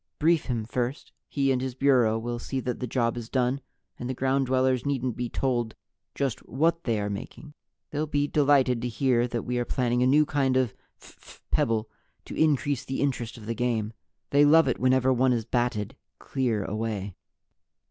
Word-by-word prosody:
Brief 160 Hz, 0 st, +3 dB
him 115 Hz, -4 st, -2 dB
first. 125 Hz, +3 st, -3 dB, 0.2 s
He 135 Hz, -2 st, +1 dB
and 125 Hz, -1 st, +1 dB
his 130 Hz, -1 st, -3 dB
Bureau 130 Hz, -5 st, +3 dB
will 120 Hz, +1 st, -4 dB
see 135 Hz, +2 st, -3 dB
that 125 Hz, 0 st, -3 dB
the 125 Hz, -, -3 dB
job 115 Hz, -1 st, 0 dB
is 115 Hz, -1 st, -6 dB
done, 130 Hz, +1 st, 0 dB, 0.4 s
and 120 Hz, -, -4 dB
the 130 Hz, -, -2 dB
Ground 135 Hz, +1 st, +1 dB
Dwellers 130 Hz, -1 st, +2 dB
needn't 130 Hz, -4 st, -1 dB
be 120 Hz, -1 st, -3 dB
told 120 Hz, -4 st, -1 dB, 0.4 s
just 135 Hz, -4 st, -1 dB
what 165 Hz, +6 st, +1 dB
they 115 Hz, -3 st, +1 dB
are 105 Hz, -, -2 dB
making. 105 Hz, +9 st, -7 dB, 0.4 s
They'll 150 Hz, +1 st, -1 dB
be 145 Hz, -1 st, +1 dB
delighted 140 Hz, -5 st, +3 dB
to 125 Hz, -, -1 dB
hear 120 Hz, 0 st, +1 dB
that 120 Hz, -1 st, -3 dB
We 125 Hz, 0 st, -2 dB
are -, -, +1 dB
planning 125 Hz, 0 st, 0 dB
a 125 Hz, -, +4 dB
new 150 Hz, +3 st, +5 dB
kind 135 Hz, -3 st, +1 dB
of 125 Hz, -5 st, +1 dB, 0.3 s
phph -, -, -16 dB
pebble 110 Hz, -1 st, +1 dB, 0.4 s
to -, -, -8 dB
increase 145 Hz, -3 st, +1 dB
the 135 Hz, -, -4 dB
interest 125 Hz, -4 st, -2 dB
of 110 Hz, -, -11 dB
the 115 Hz, -, -2 dB
game 115 Hz, -2 st, -1 dB, 0.4 s
they 145 Hz, +1 st, +5 dB
love 160 Hz, +1 st, +6 dB
it 125 Hz, -, 0 dB
whenever 130 Hz, +1 st, +3 dB
one 130 Hz, +1 st, +3 dB
is 115 Hz, -2 st, -1 dB
batted 120 Hz, -1 st, -1 dB, 0.2 s
clear 120 Hz, -6 st, -1 dB
away." 105 Hz, -1 st, -3 dB
125 Hz, 190 wpm, -27 LUFS, 120-135 Hz, 0.4 s, love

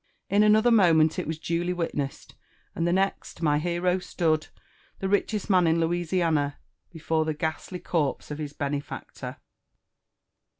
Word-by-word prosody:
In 200 Hz, +1 st, +5 dB
another, 215 Hz, +3 st, +5 dB
moment 165 Hz, -7 st, +5 dB
it -, -, -3 dB
was 160 Hz, 0 st, -3 dB
duly 170 Hz, +2 st, -1 dB
witnessed; 150 Hz, -5 st, -4 dB, 0.4 s
and 165 Hz, -, -1 dB
the -, -, +2 dB
next, 190 Hz, -2 st, -1 dB
my 150 Hz, -1 st, +3 dB
hero 175 Hz, +2 st, 0 dB
stood, 160 Hz, -3 st, 0 dB, 0.5 s
the 195 Hz, -, -3 dB
richest 205 Hz, +1 st, 0 dB
man 185 Hz, -4 st, +4 dB
in 165 Hz, +1 st, +3 dB
Louisiana, 165 Hz, -3 st, 0 dB, 0.3 s
before 160 Hz, -1 st, 0 dB
the 155 Hz, -1 st, -2 dB
ghastly 160 Hz, +4 st, -3 dB
corpse 155 Hz, -5 st, -2 dB
of 150 Hz, -, -5 dB
his 150 Hz, -2 st, -4 dB
benefactor. 145 Hz, 0 st, -5 dB
165 Hz, 140 wpm, -26 LUFS, 155-180 Hz, 0.5 s, In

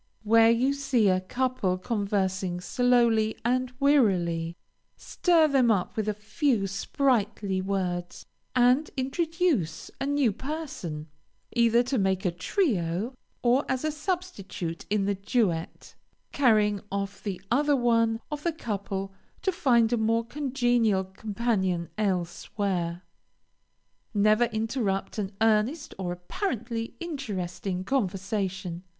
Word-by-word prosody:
Where 225 Hz, +1 st, +6 dB
you 250 Hz, +4 st, +3 dB
see 265 Hz, -7 st, +2 dB
a 185 Hz, 0 st, +2 dB
couple 245 Hz, -3 st, -1 dB
conversing 190 Hz, -3 st, -1 dB
slowly 235 Hz, 0 st, +2 dB
and 255 Hz, +1 st, +1 dB
wearily, 180 Hz, -, +2 dB, 0.4 s
stir 335 Hz, -3 st, +3 dB
them 265 Hz, -5 st, +3 dB
up 195 Hz, -5 st, +1 dB
with 215 Hz, -1 st, -1 dB
a -, -, +1 dB
few 220 Hz, +1 st, 0 dB
sprightly 200 Hz, -2 st, 0 dB
words, 180 Hz, -2 st, -3 dB, 0.3 s
and 250 Hz, +4 st, +4 dB
introduce 280 Hz, -, 0 dB
a 275 Hz, -, 0 dB
new 285 Hz, -5 st, +2 dB
person, 230 Hz, -, -5 dB, 0.5 s
either 235 Hz, 0 st, +4 dB
to 255 Hz, 0 st, -1 dB
make 190 Hz, 0 st, 0 dB
a 180 Hz, -, +2 dB
trio, 200 Hz, -, -1 dB, 0.3 s
or, 250 Hz, +3 st, +4 dB
as 260 Hz, +3 st, -1 dB
a 310 Hz, -, +1 dB
substitute 295 Hz, -, -4 dB
in 205 Hz, -1 st, +1 dB
the 200 Hz, -, +1 dB
duet, 195 Hz, -4 st, -1 dB, 0.4 s
carrying 210 Hz, -7 st, +3 dB
off 200 Hz, 0 st, -3 dB
the 200 Hz, -3 st, -4 dB
other 290 Hz, +3 st, +3 dB
one 230 Hz, -3 st, +2 dB
of 295 Hz, -1 st, -3 dB
the 335 Hz, +1 st, 0 dB
couple 195 Hz, -7 st, -4 dB, 0.3 s
to 380 Hz, -, +2 dB
find 240 Hz, -8 st, +3 dB
a -, -, +3 dB
more 225 Hz, +1 st, +1 dB
congenial 240 Hz, -7 st, +1 dB
companion 190 Hz, -3 st, -1 dB
elsewhere. 180 Hz, -2 st, -2 dB, 1.1 s
Never 215 Hz, +3 st, +4 dB
interrupt 220 Hz, -3 st, -2 dB
an 200 Hz, -1 st, -3 dB
earnest 225 Hz, +8 st, +2 dB
or 180 Hz, -2 st, -2 dB
apparently 230 Hz, -, -4 dB
interesting 195 Hz, -, -4 dB
conversation. 195 Hz, -5 st, -2 dB
220 Hz, 120 wpm, -27 LUFS, 190-255 Hz, 1.1 s, Where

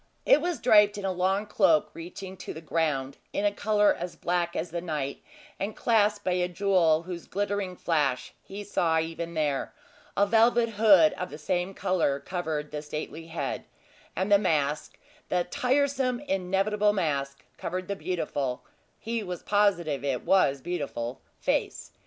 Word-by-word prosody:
It 295 Hz, -, +6 dB
was 345 Hz, -4 st, -2 dB
draped 210 Hz, -3 st, +5 dB
in 200 Hz, -, -4 dB
a 190 Hz, -, +1 dB
long 190 Hz, +3 st, 0 dB
cloak 205 Hz, 0 st, +3 dB
reaching 185 Hz, +3 st, -8 dB
to -, -, -7 dB
the -, -, -6 dB
ground, 150 Hz, -4 st, -1 dB, 0.2 s
in 205 Hz, 0 st, +1 dB
color 210 Hz, 0 st, +3 dB
as 175 Hz, +1 st, -6 dB
black 175 Hz, 0 st, -1 dB
as 165 Hz, +1 st, -3 dB
the 170 Hz, 0 st, -3 dB
night, 150 Hz, -5 st, -3 dB, 0.4 s
and 205 Hz, +2 st, -3 dB
clasped 210 Hz, -3 st, +2 dB
by 185 Hz, -, +1 dB
a 180 Hz, 0 st, +1 dB
jewel 175 Hz, -4 st, +2 dB
whose 175 Hz, -1 st, -7 dB
glittering 205 Hz, -2 st, -2 dB
flash, 145 Hz, -8 st, 0 dB
he 200 Hz, +1 st, -8 dB
saw 165 Hz, -5 st, +1 dB
even 165 Hz, +1 st, -4 dB
there; 145 Hz, -3 st, -1 dB, 0.4 s
a 200 Hz, -, +5 dB
velvet 230 Hz, +2 st, +4 dB
hood 205 Hz, -7 st, +6 dB
of 180 Hz, -, -3 dB
the 150 Hz, -, -8 dB
same 180 Hz, +4 st, -2 dB
color 180 Hz, -7 st, +1 dB
covered 155 Hz, -2 st, -4 dB
the 150 Hz, -1 st, -4 dB
stately 155 Hz, +2 st, -6 dB
head; 165 Hz, 0 st, -4 dB, 0.5 s
and 190 Hz, +3 st, -1 dB
the 200 Hz, -, +7 dB
mask 150 Hz, -6 st, 0 dB, 0.3 s
the 180 Hz, -1 st, +2 dB
tiresome, 260 Hz, +3 st, +1 dB
inevitable 205 Hz, -2 st, +1 dB
mask 140 Hz, -7 st, -2 dB
covered 185 Hz, +1 st, -4 dB
the 200 Hz, -, -2 dB
beautiful 145 Hz, -9 st, -3 dB, 0.3 s
he 230 Hz, 0 st, -3 dB
was 180 Hz, -4 st, -6 dB
positive 175 Hz, -9 st, +1 dB
it 135 Hz, -3 st, -2 dB
was 140 Hz, -8 st, +3 dB
beautiful 140 Hz, -8 st, -4 dB, 0.2 s
face. -, -, -2 dB
180 Hz, 160 wpm, -27 LUFS, 160-205 Hz, 0.5 s, the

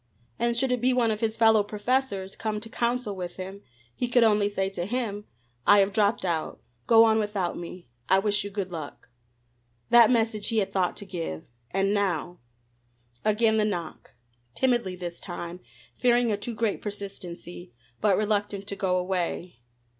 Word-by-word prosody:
And 235 Hz, 0 st, +1 dB
should 265 Hz, +1 st, +2 dB
it 250 Hz, -2 st, 0 dB
be 255 Hz, +1 st, +3 dB
one 240 Hz, -3 st, +2 dB
of 215 Hz, -, -2 dB
his 225 Hz, -1 st, -1 dB
fellow 225 Hz, -2 st, +6 dB
professors, 210 Hz, -1 st, -1 dB
come 215 Hz, -1 st, -3 dB
to 225 Hz, -, -9 dB
counsel 235 Hz, -3 st, -1 dB
with 180 Hz, -2 st, -6 dB
him, 190 Hz, +2 st, -7 dB, 0.3 s
he 245 Hz, -, -2 dB
could 245 Hz, 0 st, +4 dB
only 210 Hz, -2 st, +4 dB
say 195 Hz, -1 st, -1 dB
to 175 Hz, -2 st, -3 dB
him: 210 Hz, -3 st, -3 dB, 0.4 s
"I 205 Hz, -, +8 dB
have 200 Hz, 0 st, +3 dB
dropped 205 Hz, -2 st, +2 dB
out. 165 Hz, -3 st, -2 dB, 0.3 s
Go 225 Hz, -1 st, +8 dB
on 220 Hz, -1 st, +4 dB
without 205 Hz, -4 st, -1 dB
me. 175 Hz, -1 st, -8 dB, 0.2 s
I 190 Hz, -, +6 dB
wish 205 Hz, +1 st, +1 dB
you 205 Hz, -, -5 dB
good 195 Hz, -2 st, -4 dB
luck." 155 Hz, -7 st, -8 dB, 0.8 s
That 235 Hz, -2 st, +8 dB
message 225 Hz, -3 st, +1 dB
he 225 Hz, -, 0 dB
had 200 Hz, -3 st, 0 dB
thought 185 Hz, -2 st, 0 dB
to 205 Hz, -, -7 dB
give! 165 Hz, -, -5 dB, 0.3 s
and 195 Hz, +1 st, +1 dB
now 180 Hz, -4 st, -1 dB, 0.8 s
Again 220 Hz, +1 st, +3 dB
the 215 Hz, -, +3 dB
knock, 175 Hz, -6 st, -4 dB, 0.4 s
timidly 240 Hz, -8 st, +1 dB
this 175 Hz, -1 st, -6 dB
time, 175 Hz, -1 st, -7 dB, 0.4 s
fearing 245 Hz, -2 st, +3 dB
a -, -, +2 dB
too 230 Hz, +3 st, -5 dB
great 215 Hz, -2 st, -1 dB
persistency, 185 Hz, -, -8 dB, 0.3 s
but 205 Hz, -3 st, +3 dB
reluctant 205 Hz, -1 st, -1 dB
to 200 Hz, -, -4 dB
go 185 Hz, -2 st, 0 dB
away. 180 Hz, -4 st, -2 dB
205 Hz, 175 wpm, -27 LUFS, 185-225 Hz, 0.8 s, I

